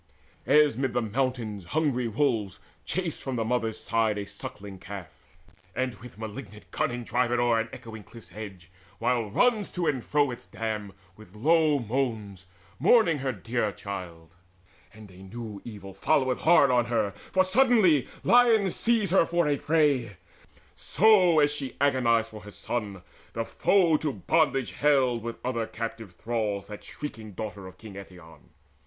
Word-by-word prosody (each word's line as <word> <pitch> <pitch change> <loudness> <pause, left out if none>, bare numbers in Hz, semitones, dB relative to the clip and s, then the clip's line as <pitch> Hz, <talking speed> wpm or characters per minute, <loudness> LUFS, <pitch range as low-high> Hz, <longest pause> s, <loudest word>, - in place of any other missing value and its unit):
As 150 -2 +5
when 135 +3 -1
amid - - -2
the 120 - +1
mountains 120 -7 -2
hungry 135 -6 +1
wolves 115 -5 0 0.3
Chase 180 -4 -3
from 135 -2 -4
the 115 -2 -1
mother's 115 -2 -1
side 110 -2 0
a 100 - -3
suckling 100 -1 -9
calf, 95 -2 -8 0.7
And 130 -1 -1
with 120 -3 -12
malignant 110 0 -9
cunning 120 0 -2
drive 120 +1 0
it 120 - +2
o'er 120 -1 +2
An 115 0 -3
echoing 110 -1 -9
cliffs 110 -5 -14
edge, 95 -5 -9 0.3
while 120 -4 0
runs 220 - +2
to 180 -1 -2
and 130 -6 0
fro 145 -3 +1
Its 120 - -9
dam 105 -3 -4 0.2
with 105 -2 -16
long 150 0 +2
moans 110 -7 -3 0.3
mourning 170 - +4
her 130 0 -1
dear 115 0 -2
child, 90 -6 -8 0.6
And 105 -2 -14
a 90 - -16
new 105 +2 -8
evil 100 -4 -9
followeth 130 +5 +1
hard 155 -5 +5
on 120 -1 +3
her, 115 -4 0 0.2
For 185 - +4
suddenly 195 - +4 0.2
lions 230 -6 +4
seize 225 -6 +1
her 185 -3 +4
for 170 -2 +1
a 145 - +2
prey; 140 - +1 0.6
So, 185 -6 +4
as 145 0 +3
she 140 -3 -5
agonized 120 -5 +2
for 110 -1 -10
her 105 - -11
son, 105 -3 -5 0.3
the 115 0 -2
foe 175 - +3
To 150 -1 -2
bondage 140 -6 +1
haled 130 -5 +2
with 115 +1 -5
other 115 -3 -1
captive 115 -4 -6
thralls 105 -2 -2
That 105 - -9
shrieking 110 -8 -8
daughter 100 -1 -6
of 95 0 -13
King 110 -1 -11
Eetion. 90 -5 -12
120 Hz, 160 wpm, -27 LUFS, 105-145 Hz, 0.7 s, As